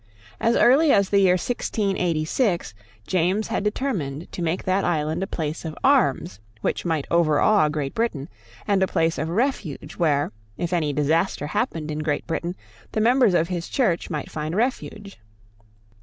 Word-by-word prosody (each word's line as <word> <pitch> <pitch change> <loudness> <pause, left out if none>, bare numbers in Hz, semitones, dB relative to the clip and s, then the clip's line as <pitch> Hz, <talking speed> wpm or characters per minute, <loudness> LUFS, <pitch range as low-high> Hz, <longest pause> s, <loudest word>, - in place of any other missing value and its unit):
As 230 +1 +2
early 280 +5 +5
as 200 -1 +3
the 200 - +4
year 190 -2 +5
1686, 185 - -1 0.3
James 185 +4 0
had - - -1
determined 190 - -3
to - - -6
make 170 +2 -1
that 190 +1 +1
island 160 0 0
a 190 - -2
place 160 -4 -4
of 160 -2 -6
arms 265 - +2 0.2
which - - -2
might 160 -4 0
overawe 170 +2 +3
Great 150 -2 -3
Britain, 170 -12 -2 0.4
and 200 -2 +2
a 190 - +3
place 165 -2 0
of 160 - -2
refuge 210 - -2
where, 145 -4 +1 0.3
if 175 0 -3
any 155 -4 +1
disaster 150 +3 0
happened 155 +1 -2
in 150 - -3
Great 150 -2 -1
Britain, 170 +1 -3 0.4
the - - 0
members 240 -3 +4
of 165 0 +2
his 175 -2 -4
Church 215 -11 0
might 150 -3 -4
find 155 +2 -4
refuge. 210 - -3
175 Hz, 160 wpm, -23 LUFS, 155-205 Hz, 0.4 s, early